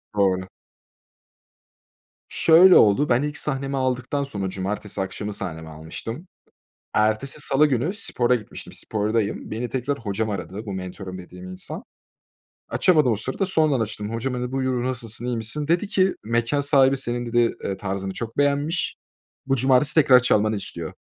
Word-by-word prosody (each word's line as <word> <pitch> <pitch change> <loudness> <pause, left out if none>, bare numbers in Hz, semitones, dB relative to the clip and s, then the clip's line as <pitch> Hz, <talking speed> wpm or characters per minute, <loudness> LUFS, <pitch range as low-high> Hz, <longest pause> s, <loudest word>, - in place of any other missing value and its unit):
Doğru. 95 -2 +1 1.8
Şöyle 175 +3 +6
oldu, 110 +8 +5
ben 120 +1 +3
ilk 150 0 -3
sahnemi 135 -1 -2
aldıktan 130 +2 -1
sonra, 100 -9 -3
cumartesi 100 +2 -3
akşamı 100 +2 -4
sahnemi 80 -4 -6
almıştım. 80 - -7 0.7
Ertesi 110 +7 +1
salı 145 +1 +3
günü, 140 - 0
spora 125 - +1
gitmiştim, 110 -4 -6
spordayım. 105 0 -2
Beni 115 +3 -3
tekrar 130 +4 -2
hocam 110 0 -2
aradı, 100 +2 -5
bu 100 - -4
mentörüm 95 0 -6
dediğim 90 0 -10
insan. 90 0 -7 0.9
Açamadım 155 -9 +3
o - - +2
sırada, 130 - -2
sonradan 155 -7 +2
açtım. 110 -1 -4
Hocam 120 +3 -2
hani 125 0 -3
buyur 130 -2 -1
nasılsın 120 -2 -4
iyi 125 -1 -1
misin? 115 +7 -3
Dedi 175 +5 +1
ki 190 -2 +2
mekân 120 +5 0
sahibi 135 -1 +4
senin 120 -2 -3
dedi, 120 0 +2
eee, 95 - -3
tarzını 95 -1 -4
çok 115 +1 -6
beğenmiş. 145 +4 0 0.5
Bu 135 - +1
cumartesi 130 +3 +3
tekrar 135 -5 +7
çalmanı 110 -3 +2
istiyor 85 -5 -5
120 Hz, 150 wpm, -23 LUFS, 105-140 Hz, 1.8 s, tekrar